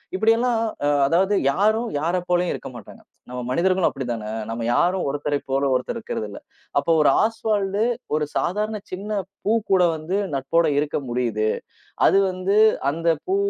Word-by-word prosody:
இப்டியேல்லாம் 225 +3 +2 0.3
அ - - +2 0.2
அதாவது 190 +7 +2 0.2
யாரும், 220 +6 +1
யாரை 175 +3 0
போலவும் 175 0 +2
இருக்க - - -8
மாட்டாங்க. 110 - -13 0.3
நம்ம 125 0 -5
மனிதர்களும் 185 +6 +2
அப்டித்தானே. 120 -5 -4 0.2
நம்ம 115 +1 -4
யாரும் 180 +2 +2
ஒருத்தரை 145 0 -1
போல 135 +1 +1
ஒருத்தர் 125 - -1
இருக்குறது 220 - -4
இல்ல. 100 - -9 0.4
அப்ப 140 +3 0
ஒரு - - +5
ஆஸ்வால்டு 210 -2 0 0.3
ஒரு 155 - 0
சாதாரண 210 +3 -1
சின்னப் 200 0 -4 0.2
பூ 210 - +2 0.2
கூட 190 -2 +5
வந்து 160 +5 -4 0.2
நட்போட 140 +5 +1
இருக்க 150 0 -1
முடியுது. 115 -3 0 0.6
அது 195 - +5
வந்து 185 +2 -1 0.3
அந்தப் 165 0 0
பூ 385 - +2
175 Hz, 150 wpm, -23 LUFS, 140-205 Hz, 0.6 s, ஒரு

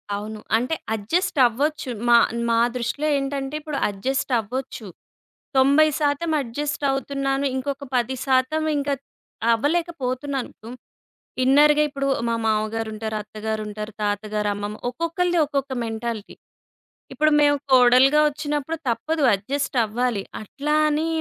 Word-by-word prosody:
అవును. 215 +1 -6 0.2
అంటే, 250 +7 -1 0.2
అడ్జస్టవ్వచ్చు. 275 - +1 0.2
మా 235 - +8 0.3
మా 230 0 +3 0.2
దృష్టిలో 250 +5 -2
ఏంటంటే, 275 +1 -3
ఇప్పుడు 300 -2 -4
అడ్జస్టవ్వచ్చు. 245 +1 -2 0.7
90% 290 +3 +3
అడ్జస్టవుతున్నాను, 275 +1 -2
ఇంకొక 275 +2 -3
10% 260 +4 +1
ఇంక 285 0 -2 0.6
అవ్వలేకపోతున్నాను. 280 -2 -1
దుం 230 +2 -8 0.7
ఇన్నర్‌గా. 295 +3 +5
ఇప్పుడు 275 -1 -3 0.2
మా 230 - +1
మావగారుంటారు, 220 0 -1
అత్తగారుంటారు, 215 0 -5
తాతగారు, 210 0 -1
అమ్మమ్మ, 205 +1 -5
ఒక్కొక్కళ్ళది 335 +5 0
ఒక్కొక్క 275 -2 -2
మెంటాలిటీ. 225 -1 -5 0.8
ఇప్పుడు 310 0 +2
మేము 290 0 +4 0.2
కోడలుగా 255 +3 +6
ఒచ్చినప్పుడు 295 +1 -3
తప్పదు, 305 +7 -1
అడ్జస్టవ్వాలి. 240 -1 -1 0.2
అట్లా 290 +8 -2
అనీ 305 +2 0
265 Hz, 95 wpm, -23 LUFS, 225-290 Hz, 0.8 s, మా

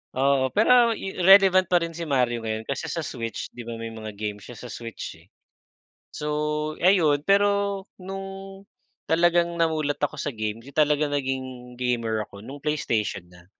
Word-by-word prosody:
Oo 135 0 +3
pero 235 +1 +5
i 195 -2 -6
relevant 185 0 +7
pa 175 -2 +3
rin 165 - -3
si 165 0 -6
Mario 125 -4 +1
ngayon 110 -1 -3
kasi 140 +7 -4
sa 165 +2 -3
switch, 115 -6 -5
'di 120 -1 -10
ba 115 - -4
may 115 0 -6
mga 110 -2 -8
game 105 0 -4
siya 120 +4 -11
sa 125 +3 -9
switch 115 -8 -7
eh. 85 - -22 0.8
So 150 - -7 0.6
ayun 165 -6 +4
pero 200 +1 +2 0.2
nung, 195 +1 -8 0.4
talagang 170 +1 +3
namulat 155 -3 0
ako 155 - -1
sa 145 0 -3
game, 110 -1 -3
'yun 140 +2 -13
talagang 150 -1 +2
naging 130 -3 -4
gamer 115 -3 -1
ako, 100 - -13
nung 135 +6 -9
PlayStation 115 - -1
na. 90 0 -17
145 Hz, 170 wpm, -25 LUFS, 115-175 Hz, 0.8 s, relevant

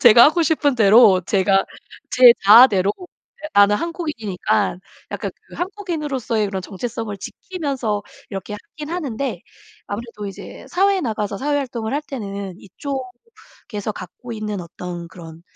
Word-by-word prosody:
제가 235 -1 +9
하고 320 +3 +4
싶은 300 -3 +2
대로 215 -3 +6
제가 195 -1 +3 0.5
제 250 -1 +8
자아대로 205 -2 +7 0.5
예 - - -3
나는 205 0 +6
한국인이니까 220 - -2 0.3
약간 - - -4 0.2
그 - - -13
한국인으로서의 300 - -2
그런 190 -2 -4
정체성을 225 +2 -5
지키면서 275 - -4 0.3
이렇게 195 +1 -5 0.2
하긴 300 -1 -6
하는데 280 -7 -3 0.5
아무래도 210 0 -6
이제 195 - -9
사회에 390 +1 +2
나가서 210 - -3
사회 290 +4 0
활동을 240 -5 -3
할 290 +2 -1
때는 200 -9 -6
이쪽에서 260 - -7
갖고 205 +6 -9
있는 215 -3 -4
어떤 175 0 -7
그런 165 -2 -12
225 Hz, 325 characters per minute, -21 LUFS, 200-285 Hz, 0.5 s, 제가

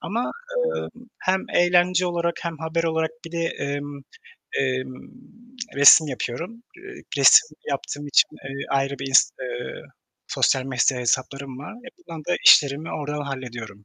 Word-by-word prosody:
ama, 235 +4 -3 0.5
emm, 245 - -7 0.2
hem 190 +1 0
eğlence 175 +1 +3
olarak 170 -1 -1
hem 165 -3 -5
haber 160 +1 -2
olarak 160 -1 -1 0.2
bir 165 - -11
de, 170 - -3
emm, 145 -1 -5 0.6
emm, 130 -1 -2 0.8
resim 145 +3 +8
yapıyorum. 165 - -6
Eee, 410 +1 -12 0.2
resim 440 +2 +6
yaptığım 145 +1 -5
için, 145 - +4 0.2
eee, 135 +1 -6
ayrı 135 0 -1
bir 135 0 -5
ins 135 - +5
eee, 125 -1 -6 0.5
sosyal 130 - +1
medya 130 0 0
hesaplarım 130 +2 -2
var. 145 - -9
Yapılan 260 - -11
da 175 - +1
işlerimi 145 +2 +5
oradan 150 -1 -4
hallediyorum. 120 -7 -8
145 Hz, 140 wpm, -23 LUFS, 135-170 Hz, 0.8 s, resim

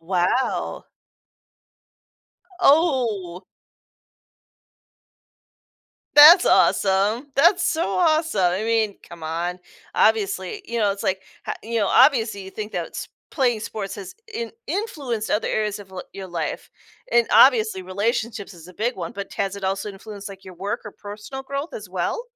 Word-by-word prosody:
Wow. 180 +9 -1 1.8
Oh. 235 - +2 2.7
That's 320 +5 +10
awesome. 205 +7 +2
That's 340 +7 +4
so 330 +1 0
awesome, 310 - +2
I 190 +4 -2
mean, 220 -3 +1
come 170 -1 -12
on 170 +3 -3 0.4
obviously 200 -4 +1
you 235 0 -3
know, 205 -2 +2
it's, 200 - -8
like, 190 -2 -1 0.3
h - - -1
you 230 +1 -2
know, 200 - +2
obviously, 230 -7 +4
you 190 - -9
think 215 +1 -6
that - - -4
sp - - -5 0.2
playing 245 -7 +1
sports 210 -2 -5
has 195 -2 -9 0.2
in 465 +1 -4 0.2
influenced 275 - -3
other 210 - 0
areas 210 -1 -1
of 195 -2 -13
li 185 -1 -7
your 195 -1 -7
life, 170 -3 -4 0.4
and, 235 -1 +4
obviously, 220 -7 +5
relationships 205 +2 -2
is 170 0 -14
a 180 - -14
big 240 +4 -1
one, 235 - -6
but 200 -2 -7
t - - -6
has 195 0 -3
it 200 - -7
also 195 +2 -2
influenced, 200 +1 -9
like, 195 0 -12
your 185 -1 -11
work 200 +6 -4
or 210 - -8
personal 210 +6 -8
growth 280 +4 -5
as 210 -3 -8
well? 185 - -2
210 Hz, 150 wpm, -23 LUFS, 190-245 Hz, 2.7 s, That's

